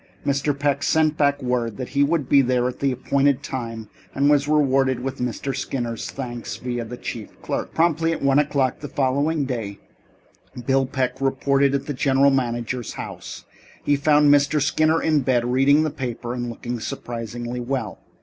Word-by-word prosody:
Mr. 140 +1 0
Peck 140 0 0
sent 155 0 +2
back 145 -2 +1
word 120 -3 -1
that 130 -2 -5
he 140 - 0
would 145 -1 +1
be 140 - +6
there 125 -1 +1
at 125 - -5
the 140 -1 +1
appointed 140 +2 +1
time 115 -4 -5 0.3
and 140 +2 +3
was 145 -1 +3
rewarded 135 -4 +2
with 135 +1 -4
Mr. 125 +2 -3
Skinner's 120 -4 -3
thanks, 120 -3 -6
via 120 -1 -3
the 120 +2 -8
chief 110 -4 -7
clerk. - - -3
Promptly 165 0 +2
at 165 - -2
one 135 +1 +4
o'clock 140 -3 +1
the 145 - -6
following 140 +3 0
day, 115 -6 -4 0.9
Bill 135 0 +2
Peck 130 -1 -2
reported 135 +1 +2
at 140 - -2
the 145 - -3
general 135 +1 +3
manager's 120 -2 -2
house. - - -8 0.4
He 145 - +3
found 145 0 +4
Mr. 145 +1 +3
Skinner 155 +3 +2
in 155 -2 +3
bed, 125 -3 +1
reading 135 +5 +4
the 155 - -1
paper 120 -3 -4
and 120 -1 -3
looking 120 +1 -5
surprisingly 120 +1 -5
well. 120 -4 -3
135 Hz, 175 wpm, -23 LUFS, 125-145 Hz, 0.9 s, be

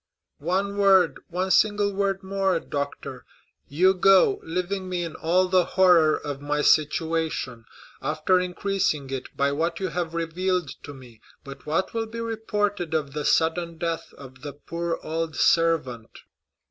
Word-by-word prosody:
"One 195 +6 -1
word—one 190 -1 +2
single 205 -1 +3
word 195 0 -1
more, 190 -2 0
doctor! 140 -2 -5 0.4
You 185 +6 +3
go, 195 - +4
leaving 185 +3 -3
me 180 -1 -2
in 165 -2 -5
all 180 +3 +1
the 185 -1 +3
horror 175 -5 +5
of 145 -2 -6
my 150 +1 -1
situation, 155 -6 0 0.4
after 155 +6 +1
increasing 180 -6 -1
it 130 -1 -5
by 140 0 +2
what 165 +3 -1
you 190 -1 -2
have 170 -1 -3
revealed 175 0 -1 0.2
to 145 - -9
me. 120 -4 -15 0.2
But 140 0 -11
what 165 +5 -1
will 225 -1 -2
be 230 +1 -7
reported 210 -6 -2
of 145 -3 -2
the 150 0 -3
sudden 165 +1 +1
death 165 0 -3
of 135 -1 -13
the 145 -1 -7
poor 170 +3 -4
old 160 0 -3
servant?" 150 -9 +1
170 Hz, 145 wpm, -25 LUFS, 150-190 Hz, 0.4 s, horror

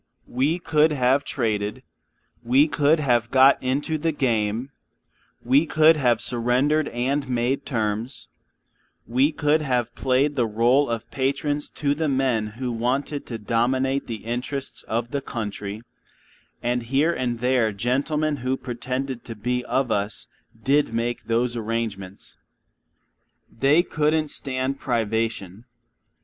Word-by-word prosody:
We 140 +7 0
could 155 -2 +2
have 135 0 +2
traded; 105 -5 -2 0.6
we 130 +6 +4
could 150 +1 +2
have 120 -5 +1
got 135 +1 +5
into 145 +5 -1
the 165 +2 0
game; 120 -3 -1 0.7
we 135 +6 +3
could 155 +2 +5
have 120 -6 +2
surrendered 130 +6 +1
and 135 +3 -1
made 125 +3 -1
terms; 115 +1 -2 0.8
we 130 +6 +2
could 150 +1 +1
have 125 -5 -1
played 135 +3 +1
the 120 -4 +1
rôle 120 +5 +2
of 115 0 -4
patrons 140 +2 -1
to 145 -2 +1
the 155 +2 -1
men 130 -5 +1
who 125 -1 -2
wanted 130 +5 -2
to 115 - -4
dominate 130 +5 0
the 110 -3 -6
interests 125 +4 -4
of 115 +2 -2
the 140 - -1
country, 105 -4 -5 0.8
and 120 +1 0
here 135 +8 +1
and 120 -4 -2
there 125 -2 +2
gentlemen 140 +8 0
who 130 +1 -1
pretended 125 +1 -4
to 115 - -7
be 125 +4 -2
of 130 -3 0
us 100 0 -2 0.4
did 140 0 +2
make 120 +1 -2
those 120 +1 0
arrangements. 110 -4 -4 1.1
They 140 +8 +3
couldn't 155 -2 0
stand 130 0 -3
privation. 110 -3 -2
125 Hz, 130 wpm, -24 LUFS, 115-140 Hz, 1.1 s, got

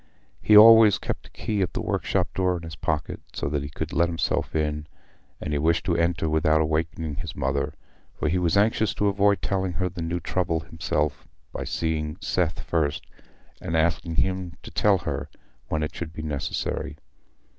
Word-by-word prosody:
He 105 - +6
always 110 -1 +9
kept - - -5
a - - -19
key 105 -2 -2
of 90 -4 -1
the - - -2
workshop - - -1
door 90 -1 +1
in 85 - -9
his 80 -3 -7
pocket, 80 -1 -2
so - - -3
that 75 -1 -1
he 70 - -5
could 80 +1 -5
let 85 +1 +2
himself 85 -1 -1
in; 75 -1 -1 0.5
and 75 - -4
he 75 - +1
wished 80 +5 +1
to 85 -3 +1
enter 85 -1 +1
without 80 0 +3
awaking 80 0 -1
his 85 -3 -6
mother, 70 +2 -1 0.4
for - - -1
he 90 +5 +1
was 90 +1 +2
anxious 110 +1 +2
to 105 - +2
avoid 100 0 +2
telling 95 -2 -1
her 90 +2 -1
the 85 0 -7
new 85 +1 -2
trouble 85 -2 -1
himself 75 -2 -2 0.3
by - - -4
seeing 80 -1 -2
Seth 90 -5 -1
first, 75 -4 -1 0.6
and 80 - -1
asking 80 +1 0
him 95 -1 0
to - - -10
tell 105 -2 +3
her - - -4 0.4
when 75 -1 -1
it 75 +1 -3
should 80 -2 -6
be 80 - -6
necessary. 75 -3 -3
80 Hz, 190 wpm, -25 LUFS, 75-90 Hz, 0.6 s, always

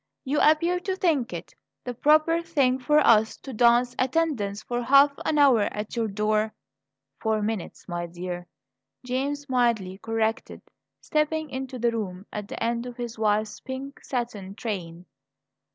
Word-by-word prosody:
"You 285 +3 +1
appear 335 +4 +4
to 380 +1 -2
think 305 -10 +1
it - - -7 0.3
the 250 - -4
proper 310 +6 +3
thing 275 -6 +1
for 295 +4 +2
us 220 -1 +4
to 265 - -9
dance 240 +2 +4
attendance 255 -8 0
for 240 +1 -2
half 275 +3 +6
an 305 - +1
hour 270 -6 +6
at 210 +2 -5
your 230 -1 0
door 215 +1 0 0.3
" 135 0 -56
"Four 220 -1 0
minutes, 215 -4 -4
my 175 -1 -3
dear," 175 +1 -6 0.6
James 280 +3 -2
mildly 230 -7 +1
corrected, 225 0 -2 0.4
stepping 305 0 -1
into 260 0 -5
the 235 0 +1
room 195 -4 -4
at 210 -1 -5
the - - -5
end 235 +1 -1
of 245 - -9
his 240 -2 -6
wife's 215 0 0
pink 265 +1 -7
satin 220 -7 -4
train. 180 -6 -5
235 Hz, 155 wpm, -26 LUFS, 210-275 Hz, 0.6 s, half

